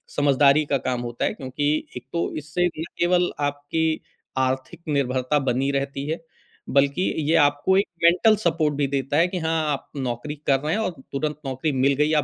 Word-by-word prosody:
समझदारी 145 +1 +4
का 140 -1 +1
काम 125 -2 -2
होता 120 -1 -3
है - - 0
क्योंकि 135 +2 -2 0.3
एक 125 - -9
तो 170 - 0
इससे 155 +4 -1
ना 160 -2 -5 0.2
केवल 175 +1 +3
आपकी 145 +3 -1 0.4
आर्थिक 130 +1 -1
निर्भरता 135 -1 +1
बनी 135 0 0
रहती 140 0 -2
है, 160 - -2 0.5
बल्कि 140 +4 +2 0.3
ये 165 - +4
आपको 145 +6 +2
एक 200 - +2 0.2
मेंटल 180 +6 +5
सपोर्ट 160 -3 +2
भी 140 -1 +1
देता 135 +1 -1
है 170 +2 +5
कि 180 0 -4
हाँ, 160 -2 0
आप 140 - -4
नौकरी 130 +3 -3
कर 135 -1 +4
रहे 150 +3 -1
हैं 215 - 0
और 220 - -1 0.2
तुरंत 150 +2 -2
नौकरी 135 +3 -1
मिल 135 +1 +2
गई। 150 +3 +2
145 Hz, 185 wpm, -24 LUFS, 135-160 Hz, 0.5 s, मेंटल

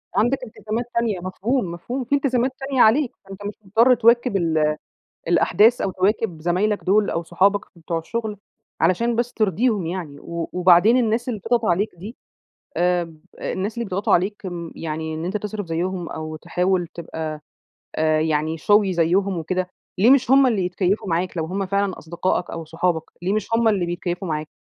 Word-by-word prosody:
عندك 240 +7 +3
التزامات 220 0 -4
تانية، 230 -5 0
مفهوم، 190 +3 -2
مفهوم، 240 +10 -4
في 255 +4 +1
التزامات 260 -2 +1
تانية 270 -2 0
عليك 245 +4 +4
فأنت 195 +1 -10
مش 205 - -3
مضطر 230 +6 +5
تواكب 235 -1 +3
ال 155 -3 +1 0.5
الأحداث، 205 +7 +4
أو 195 - -1
تواكب 185 -2 0
زمايلك 185 +5 0
دول 205 +2 +3
أو 170 - -2
صحابك 195 +5 +2
بتوع 165 0 -4
الشغل، 215 +5 -4 0.4
علشان 235 +6 +2
بس 240 +1 -1
ترضيهم 215 -1 +1
يعني 165 -5 -5
و 170 +1 -5
وبعدين 180 +6 +5
الناس 235 0 0
اللي 220 -4 -3
بتضغط 235 +4 0
عليك 195 +3 +1
دي 200 +8 -9 0.6
آمم 175 -3 0 0.2
الناس 200 +4 -3
اللي 235 +1 -3
بيضغطوا 195 0 0
عليك 195 +4 +1 0.3
يعني 160 0 -4
أنت 175 +6 -2
تصرف 210 0 -5
زيهم 175 +2 -2
أو 155 0 -5
تحاول 180 +2 0
تبقى 160 -2 -6 0.5
آآ 155 0 +2
يعني 155 0 0
showy 205 +4 +3
زيهم 180 +3 +1
وكده، 180 +3 -2 0.3
ليه 210 +6 +5
مش 260 -2 +4
هم 270 0 +6
اللي 210 -7 +1
يتكيّفوا 185 +3 -1
معاك، 175 +2 -1
لو 160 - -1
هم 195 +4 -2
فعلًا 200 0 -1
أصدقائك 170 +2 -2
أو 165 -1 -6
صحابك، 165 0 -1 0.2
ليه 185 +3 0
مش 215 -2 -1
هم 230 0 +3
اللي 200 -5 +2
بيتكيفوا 175 +1 -3
معاك؟ 155 -1 -2
190 Hz, 170 wpm, -22 LUFS, 170-220 Hz, 0.6 s, هم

